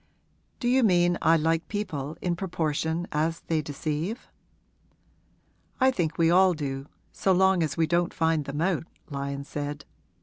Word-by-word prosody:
'Do 240 - -1
you 260 +2 +4
mean 175 -5 +4
I 165 +1 +5
like 165 +1 0
people 160 -8 -4
in 175 -1 0
proportion 165 -2 -1
as 160 +2 0
they 160 -2 -1
deceive?' 155 - -4 1.5
'I 260 0 +5
think 165 -9 -2
we 165 0 +4
all 185 0 +5
do, 135 -2 -4 0.2
so 195 - 0
long 190 0 +4
as 150 -4 -1
we 165 - +3
don't 175 +2 +1
find 160 -2 +1
them 140 +2 -4
out,' 170 -2 0 0.2
Lyon 140 0 -3
said. 145 0 -5
165 Hz, 155 wpm, -27 LUFS, 150-180 Hz, 1.5 s, I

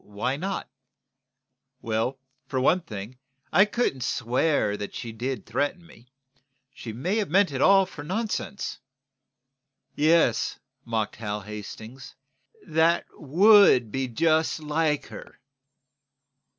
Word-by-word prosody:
"Why 105 +6 -3
not?" 190 +6 -4 1.1
"Well, 115 +3 -2 0.3
for 130 - -2
one 160 +8 +3
thing, 110 - -8 0.3
I 195 - +7
couldn't 210 - -1
swear 125 -2 0
that 105 -1 -6
she 115 - -6
did 125 +4 -4
threaten 145 - -2
me. 120 -7 -18 0.7
She 115 - -8
may 170 - -2
have 210 -3 -1
meant 190 +1 +3
it 135 -1 -3
all 195 +2 +6
for 150 -5 -10
nonsense." 205 +3 -3 1.1
"Yes," 155 -5 +2 0.3
mocked 110 -2 -2
Hal 105 -2 -4
Hastings. 110 +5 -9 0.5
"That, 165 +2 +2
would 170 - +5
be 135 +2 -2
just 160 +6 +1
like 150 -1 0
her!" - - -11
135 Hz, 115 wpm, -26 LUFS, 115-170 Hz, 1.1 s, I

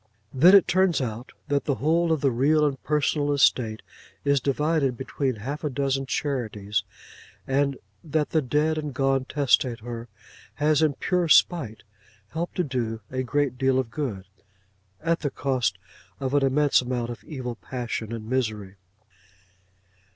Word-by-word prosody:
Then 170 +9 +7
it 195 - +6
turns 185 -4 +3
out, 120 -1 -4 0.2
that 145 -1 0
the 140 - +1
whole 165 +4 +1
of 160 -3 +1
the 140 - +3
real 150 +6 +3
and 140 -3 -2
personal 150 -1 0
estate 120 -6 +2 0.4
is 140 -1 +3
divided 140 -1 0
between 135 -1 -2
half 135 +9 -6
a 150 - 0
dozen 135 0 -1
charities; 110 -8 -2 0.6
and 140 0 +1 0.3
that 155 -1 -1
the 160 - +2
dead 150 +4 +1
and 150 -3 -5
gone 135 -1 +1
testator 120 -4 0 0.5
has 150 +1 +2
in 155 -2 +3
pure 180 +2 0
spite 150 -8 +3 0.5
helped 170 +2 -4
to 180 - +1
do 120 -6 -3
a 130 0 -1
great 130 0 -1
deal 135 -1 +2
of 130 -3 -1
good, 110 -11 -4 0.8
at 165 0 +1
the 145 - -1
cost 130 -2 -1 0.4
of 135 -1 -3
an 145 -1 +3
immense 140 +1 +3
amount 120 -1 -3
of 120 - -9
evil 130 -5 -5
passion 115 -2 -5
and 110 -2 -6
misery. 110 -6 -2
135 Hz, 150 wpm, -25 LUFS, 125-150 Hz, 0.8 s, Then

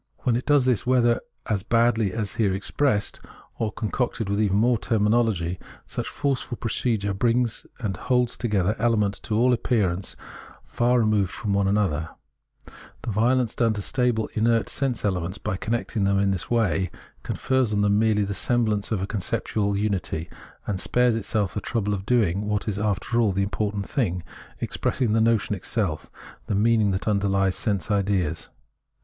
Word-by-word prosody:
When 120 - +2
it 125 - -3
does 145 -3 +4
this 125 -6 +2
whether 120 -1 +3 0.2
as 105 -4 -1
baldly 115 -1 +2
as - - -7
it - - -7
is - - -9
here 100 -4 +2
expressed 105 +2 0 0.4
or 110 -2 0
concocted 115 -1 -2
with 100 +1 +1
even 100 -2 +2
more 120 +1 +3
terminology, 105 -5 +1 0.3
such - - -4
forceful 135 -4 -2
procedure 110 -3 -1
brings 115 +3 0
and 100 -5 -2
holds 125 +1 +1
together 105 -3 0
elements 105 -4 +1
to 110 -2 -2
all 125 +2 +4
appearance 100 -7 0 0.5
far 120 +1 +2
re - - +2
moved 105 -3 +2
from 105 -4 -3
one 100 0 +2
another; 95 -6 0 0.9
the 120 - -2
violence 120 +2 +2
done 115 -2 +2
to 105 -2 -4
stable 125 -3 +1
inert 115 -1 +2
sense 130 -6 -1
elements 95 -1 -1
by 105 -2 -3
connecting 110 +1 -2
them 100 0 +2
in 100 0 +2
this 95 -3 -3
way, 100 -6 +1 0.3
confers 130 -4 0
on 105 -1 +1
them 105 0 +3
merely 110 -2 +3
the 100 0 -2
semblance 110 -2 0
of 100 -4 0
a - - 0
conceptual 100 0 -1
unity, 95 -5 -2 0.3
and 95 -3 -2
spares 125 -2 +2
itself 105 -4 -1
the 105 - -3
trouble 105 -2 -1
of 95 0 -5
doing 105 -5 +2
what 105 +1 -1
is 100 -2 -1
after 105 +3 0
all 110 -3 +3
the 100 +1 0
important 100 0 -2
thing 90 - -1 0.2
— - - -21
expressing 115 -5 0
the 110 - +3
notion 110 -2 +2
itself, 95 -4 -2 0.4
the 105 - 0
meaning 110 0 +3
that 95 +2 -2
underlies 100 -2 +2
sense 105 0 -1
ideas. 95 -5 0
105 Hz, 175 wpm, -25 LUFS, 100-120 Hz, 0.9 s, does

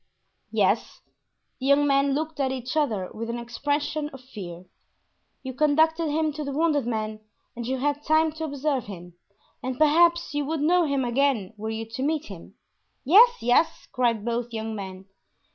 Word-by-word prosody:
"Yes." - - 0 0.6
The 265 - -3
young 280 +1 +5
men 275 0 +2
looked 315 +1 -3
at 265 -1 +1
each 255 +1 -4
other 220 -12 0
with 230 +1 -5
an 235 - -3
expression 290 +5 -2
of 265 -3 -12
fear. 185 -9 -9 0.8
"You 260 -1 -5
conducted 315 +3 +2
him 310 0 0
to 305 +1 -5
the 280 - -4
wounded 295 -3 +1
man 215 -2 -3 0.4
and 235 0 -5
you 265 +1 -1
had 290 +2 -1
time 315 0 +3
to 320 +1 -5
observe 280 -3 -2
him, 175 -3 -10 0.5
and 255 0 -4
perhaps 340 +3 +4
you 290 0 0
would 310 +1 -2
know 345 +3 +3
him 280 -3 0
again 240 -5 +1
were 215 +1 -5
you 225 0 -4
to 225 +3 -7
meet 305 +2 0
him." 195 +1 -11 0.5
"Yes, 455 - +6
yes!" 250 +7 +2
cried 235 -4 0
both 235 0 -2
young 220 0 -4
men. 190 -2 -7
275 Hz, 175 wpm, -25 LUFS, 230-305 Hz, 0.8 s, Yes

